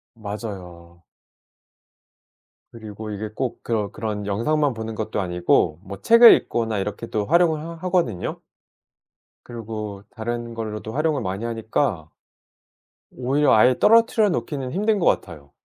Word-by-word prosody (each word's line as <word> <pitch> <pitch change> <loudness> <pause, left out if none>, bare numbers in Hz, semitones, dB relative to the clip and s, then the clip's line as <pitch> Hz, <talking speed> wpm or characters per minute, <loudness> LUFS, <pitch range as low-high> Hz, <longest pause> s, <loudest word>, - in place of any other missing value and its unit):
맞아요. 90 -6 -8 1.7
그리고 110 -1 -8
이게 105 +1 -5
꼭 125 +3 -5
그런, 105 -4 -2
그런 105 -2 -4
영상만 135 +8 0
보는 110 0 -6
것도 110 -1 -3
아니고 90 -3 +1
뭐 100 0 -9
책을 230 +1 +8
읽거나 115 -3 -1
이렇게 105 +4 -4
또 105 -2 -2
활용을 165 +1 +3
하 165 +1 -7
하거든요. 170 - -2 1.0
그리고 110 -4 -7
다른 120 +1 -5
걸로도 110 -1 -6
활용을 150 -2 0
많이 95 +4 -4
하니까 115 - -2 1.0
오히려 135 +4 +1
아예 125 +3 +5
떨어뜨려 225 -1 +4
놓기는 130 -4 -3
힘든 210 +3 +1
것 170 - 0
같아요. 75 -6 -1
110 Hz, 290 characters per minute, -22 LUFS, 100-140 Hz, 1.7 s, 책을